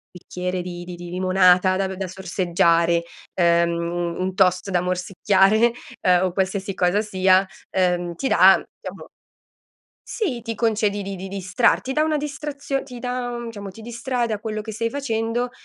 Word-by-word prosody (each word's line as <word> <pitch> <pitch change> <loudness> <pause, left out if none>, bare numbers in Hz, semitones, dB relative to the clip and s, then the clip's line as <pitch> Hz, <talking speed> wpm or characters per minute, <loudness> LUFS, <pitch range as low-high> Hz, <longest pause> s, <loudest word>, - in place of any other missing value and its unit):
bicchiere 180 +1 -4
di 175 0 -7
di 175 0 -8
di 175 0 -8
limonata 185 0 +3
da 195 -1 0
v 190 - -5
da 190 0 -4
sorseggiare, 170 -2 +1 0.3
ehm, 170 -1 +3 0.5
u - - -4
un 185 0 -2
toast 185 0 +2
da 175 -2 +1
morsicchiare, 195 +5 +2 0.3
ehm, 180 0 +4
o 180 - -2
qualsiasi 190 +1 -1
cosa 180 +3 +1
sia, 190 -2 +3 0.2
ehm, 175 -2 0
ti 265 - -2
dà, - - +6 0.2
diciamo - - -8 1.0
Sì, 285 - -3
ti 230 -1 -5
concedi 210 -3 0
di 195 0 -5
di 190 +1 -7
distrar 200 +5 +1
ti 265 - -4
dà 305 - +2
una 310 -1 +1
distrazio 285 -2 -4
ti 250 -3 -10
dà, 245 -1 -3
diciamo, 205 -3 -7
ti 220 +4 -12
distrae 240 +1 -2
da 215 -2 -3
quello 215 -1 -4
che 220 0 -7
stai 230 +1 -1
facendo, 240 -2 -2
195 Hz, 170 wpm, -22 LUFS, 180-230 Hz, 1.0 s, dà